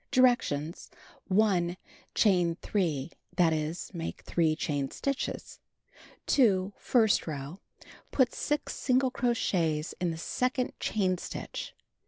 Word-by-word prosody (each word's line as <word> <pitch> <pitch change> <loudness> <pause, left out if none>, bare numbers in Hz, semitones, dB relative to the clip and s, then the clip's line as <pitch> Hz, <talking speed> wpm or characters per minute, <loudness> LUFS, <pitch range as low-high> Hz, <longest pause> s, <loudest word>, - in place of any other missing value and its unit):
Directions: 210 - +2 0.4
1. 185 -3 +2 0.4
Chain 180 -5 +3
3; 165 -7 -1 0.2
that 170 -3 +4
is, 155 +3 -3
make 165 -2 -5
3 160 -2 +1
chain 145 -4 -1
stitches. 275 -1 -3 0.7
2. 200 -7 +3
First 220 -8 +3
row: 145 +3 -5 0.5
Put 255 -3 +2
6 295 -1 -1
single 255 0 +2
crochets 170 -11 0
in 170 -3 -1
second 250 +8 -1
chain 185 -4 0
stitch. - - -6
185 Hz, 105 wpm, -29 LUFS, 160-240 Hz, 0.7 s, that